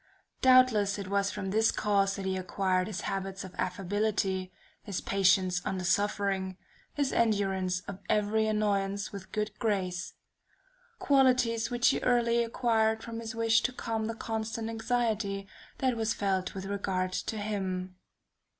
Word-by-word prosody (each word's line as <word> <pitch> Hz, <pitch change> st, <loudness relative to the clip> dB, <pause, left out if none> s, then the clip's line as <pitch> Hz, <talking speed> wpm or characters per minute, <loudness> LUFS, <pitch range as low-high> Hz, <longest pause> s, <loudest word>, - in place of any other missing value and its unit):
Doubtless 255 Hz, -6 st, +5 dB
it 200 Hz, -2 st, -6 dB
was 200 Hz, 0 st, +1 dB
from 190 Hz, -1 st, -4 dB
this 220 Hz, +2 st, +3 dB
cause 200 Hz, -2 st, +1 dB
that 195 Hz, -, -5 dB
he 190 Hz, 0 st, 0 dB
acquired 185 Hz, 0 st, 0 dB
his 210 Hz, -1 st, -4 dB
habits 195 Hz, 0 st, -3 dB
of 185 Hz, -1 st, -9 dB
affability, 190 Hz, 0 st, -1 dB, 0.3 s
his 200 Hz, -4 st, -4 dB
patience 190 Hz, -2 st, +2 dB
under 190 Hz, -1 st, -2 dB
suffering, 195 Hz, 0 st, 0 dB, 0.4 s
his 285 Hz, -2 st, 0 dB
endurance 195 Hz, -5 st, +1 dB
of 195 Hz, 0 st, -8 dB
every 215 Hz, +1 st, +2 dB
annoyance 200 Hz, -2 st, 0 dB
with 200 Hz, -2 st, -7 dB
a -, -, -31 dB
good 215 Hz, 0 st, -2 dB
grace; 185 Hz, -5 st, -1 dB, 0.8 s
qualities 250 Hz, -, +3 dB
which 240 Hz, 0 st, +3 dB
he -, -, +1 dB
early 235 Hz, -1 st, +2 dB
acquired 225 Hz, -2 st, +1 dB
from 230 Hz, -1 st, -6 dB
his 225 Hz, 0 st, -6 dB
wish 225 Hz, 0 st, +3 dB
to 255 Hz, -, 0 dB
calm 225 Hz, -3 st, -3 dB
the 225 Hz, -, -3 dB
constant 225 Hz, 0 st, -3 dB
anxiety 220 Hz, -4 st, -1 dB, 0.3 s
that 260 Hz, -2 st, +1 dB
was 225 Hz, -1 st, 0 dB
felt 190 Hz, -2 st, -1 dB
with 190 Hz, 0 st, -5 dB
regard 190 Hz, -2 st, -2 dB
to 220 Hz, -, -3 dB
him. 190 Hz, -3 st, -3 dB
205 Hz, 150 wpm, -30 LUFS, 190-225 Hz, 0.8 s, Doubtless